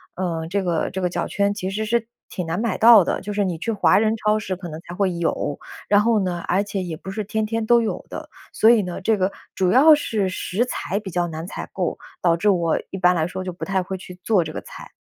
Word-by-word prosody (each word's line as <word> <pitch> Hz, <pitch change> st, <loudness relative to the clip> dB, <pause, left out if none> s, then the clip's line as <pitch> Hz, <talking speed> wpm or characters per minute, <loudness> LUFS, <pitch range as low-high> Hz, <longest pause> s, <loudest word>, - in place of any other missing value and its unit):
呃， 165 Hz, -3 st, -3 dB
这 200 Hz, +2 st, 0 dB
个 170 Hz, -3 st, 0 dB
这 190 Hz, -, -4 dB
个 180 Hz, -, +1 dB
脚 -, -, -2 dB
圈 200 Hz, 0 st, 0 dB
其 190 Hz, -2 st, -4 dB
实 215 Hz, +3 st, -2 dB
是 230 Hz, +1 st, 0 dB, 0.2 s
挺 180 Hz, -, -4 dB
难 165 Hz, +2 st, -2 dB
买 225 Hz, -3 st, -1 dB
到 225 Hz, -3 st, +8 dB
的。 -, -, -1 dB
就 205 Hz, +2 st, -5 dB
是 205 Hz, 0 st, +1 dB
你 180 Hz, -4 st, -2 dB
去 230 Hz, +8 st, -2 dB
华 210 Hz, -, +3 dB
人 220 Hz, +1 st, +2 dB
超 215 Hz, -1 st, +1 dB
市 190 Hz, -3 st, -3 dB
可 175 Hz, -1 st, -8 dB
能 155 Hz, 0 st, -7 dB
才 175 Hz, -, -10 dB
会 195 Hz, -1 st, +1 dB
有， 165 Hz, -4 st, -2 dB, 0.3 s
然 205 Hz, 0 st, +5 dB
后 225 Hz, 0 st, +3 dB
呢， 180 Hz, -3 st, -2 dB
而 190 Hz, +3 st, +2 dB
且 200 Hz, -1 st, -4 dB
也 170 Hz, -3 st, -5 dB
不 190 Hz, -, -9 dB
是 215 Hz, +2 st, -3 dB
天 215 Hz, +2 st, -2 dB
天 225 Hz, +1 st, -2 dB
都 235 Hz, +1 st, +5 dB
有 225 Hz, -, -3 dB
的。 -, -, -7 dB, 0.2 s
所 220 Hz, -, +4 dB
以 235 Hz, -2 st, +6 dB
呢， 180 Hz, +1 st, -5 dB
这 215 Hz, +3 st, +2 dB
个 190 Hz, 0 st, 0 dB, 0.2 s
主 185 Hz, -2 st, +2 dB
要 295 Hz, +6 st, +7 dB
是 215 Hz, -9 st, -1 dB
食 190 Hz, +4 st, -1 dB
材 200 Hz, -5 st, -3 dB
比 205 Hz, -2 st, -8 dB
较 175 Hz, 0 st, 0 dB
难 160 Hz, 0 st, -6 dB
采 -, -, -7 dB
购， -, -, -2 dB, 0.2 s
导 170 Hz, -2 st, +3 dB
致 210 Hz, +5 st, +2 dB
我 170 Hz, -4 st, +2 dB
一 -, -, -4 dB
般 180 Hz, -1 st, +4 dB
来 160 Hz, -2 st, +1 dB
说 185 Hz, +1 st, -5 dB
就 185 Hz, -, -4 dB
不 175 Hz, -, -6 dB
太 195 Hz, -1 st, 0 dB
会 190 Hz, +1 st, -5 dB
去 180 Hz, 0 st, -12 dB
做 200 Hz, -5 st, +3 dB
这 155 Hz, -, -6 dB
个 -, -, -5 dB
菜。 -, -, -12 dB
190 Hz, 285 characters per minute, -22 LUFS, 180-215 Hz, 0.3 s, 到